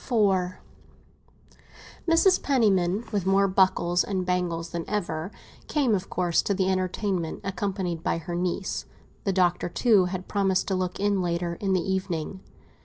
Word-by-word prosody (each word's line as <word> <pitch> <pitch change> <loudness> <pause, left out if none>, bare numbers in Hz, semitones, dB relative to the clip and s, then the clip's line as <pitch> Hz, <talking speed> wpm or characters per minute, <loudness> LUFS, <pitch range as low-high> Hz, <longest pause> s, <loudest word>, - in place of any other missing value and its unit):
IV 190 -7 +1 1.5
MRS. 350 +3 +4
PENNIMAN, 210 -6 +2
with 200 -3 -1
more 195 +1 +4
buckles 185 -2 +3
and 190 -2 -2
bangles 175 -2 -1
than 170 -1 -3
ever, 180 -5 -2 0.4
came, 275 -7 +1
of 190 -2 -1
course, 175 -2 +1
to 200 - -1
the 190 0 +1
entertainment, 185 -2 -1
accompanied 190 -3 -2
by - - 0
her 175 +1 -6
niece; 180 +2 -2 0.4
the 195 - +2
Doctor, 180 -2 +1
too, 210 -1 +4
had 185 0 -4
promised 195 -2 +1
to - - 0
look 185 -1 -2
in 200 -1 +1
later 170 0 -1
in 190 +2 -1
the 185 - +2
evening. 185 -1 -3
185 Hz, 150 wpm, -26 LUFS, 175-200 Hz, 1.5 s, MRS